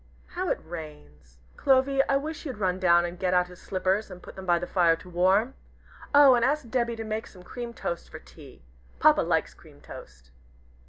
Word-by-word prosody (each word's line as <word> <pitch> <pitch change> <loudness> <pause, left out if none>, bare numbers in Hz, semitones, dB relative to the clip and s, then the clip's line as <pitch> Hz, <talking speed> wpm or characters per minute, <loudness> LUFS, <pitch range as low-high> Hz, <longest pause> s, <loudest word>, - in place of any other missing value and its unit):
How 365 0 -3
it - - 0
rains! 110 - -11 0.2
Clovy, 270 0 +3
I 275 - +3
wish 305 +3 -6
you'd 265 -8 -6
run 185 -2 -1
down 175 -1 +4
and 175 0 -7
get 185 -1 0
out 180 0 +2
his 180 - -14
slippers 190 +2 -1
and 180 - -10
put - - -12
them 190 -1 -9
by 175 -1 +4
the 175 - -4
fire 175 -3 +3
to 165 - -15
warm. 190 +8 +2 0.6
Oh, 285 -2 +7
and 240 -1 +2
ask 285 +1 0
Debby 235 -1 -1
to 225 - -6
make 220 +1 -4
some 180 -2 -15
cream 240 +4 -7
toast 170 -6 -5
for - - -9
tea! 60 0 -16 0.3
Papa - - +5
likes - - 0
cream - - -19
toast." - - -13
190 Hz, 205 wpm, -26 LUFS, 175-245 Hz, 0.6 s, Oh